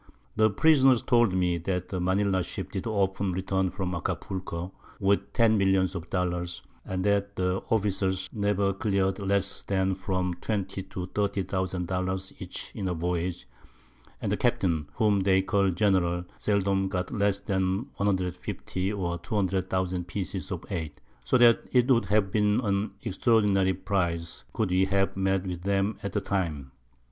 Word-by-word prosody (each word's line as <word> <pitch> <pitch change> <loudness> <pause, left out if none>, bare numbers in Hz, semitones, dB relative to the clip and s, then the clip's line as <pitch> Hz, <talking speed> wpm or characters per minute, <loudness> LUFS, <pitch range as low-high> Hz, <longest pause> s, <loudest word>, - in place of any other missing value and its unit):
The 110 0 +4
Prisoners 135 -1 +5
told 120 -4 +4
me, 90 -2 +1
that 90 +1 -2
the 95 - -3
Manila 95 +1 +1
Ship - - -6
did 95 +2 -4
often 95 -3 0
return 95 0 0
from 90 -1 -3
Acapulco, 90 0 -4 0.3
with 100 0 +1
10 110 -2 +4
Millions 95 -1 +2
of 85 -2 -6
Dollars, 90 -1 -2 0.2
and 95 0 -3
that 100 0 +1
the 90 +1 0
Officers 95 -3 0
never 100 -2 +1
clear'd 95 -1 0
less 100 -1 0
than 95 -1 0
from 90 -1 -1
20 100 -3 -2
to 95 -1 -6
30000 95 -3 -1
Dollars 95 +1 -2
each - - -6
in 95 - -3
a 90 - -1
Voyage; 85 +1 -2 0.7
and - - -2
the - - +1
Captain, 80 -5 +1
whom 105 -2 +3
they 95 0 +3
call 100 -2 +2
General, 90 -2 +1
seldom 100 -2 +1
got 90 -1 -3
less 100 -3 +1
than 95 +1 0
150 95 0 -2
or 85 -4 -2
200000 95 -1 -1
Pieces 95 0 -4
of 90 -3 -5
8; 80 -6 -4 0.2
so 130 - +3
that 120 -2 +6
it 125 +1 +4
would 120 -2 +4
have 105 -2 +2
been 105 0 +2
an 100 -2 0
extraordinary 100 -2 +2
Prize, 85 -3 -2
could 110 -5 -1
we 95 +1 +4
have 95 0 +1
met 95 0 +1
with 90 -2 -4
them 100 +2 0
at 100 - -4
the 105 - 0
Time. 80 -10 -2
95 Hz, 155 wpm, -27 LUFS, 90-100 Hz, 0.7 s, that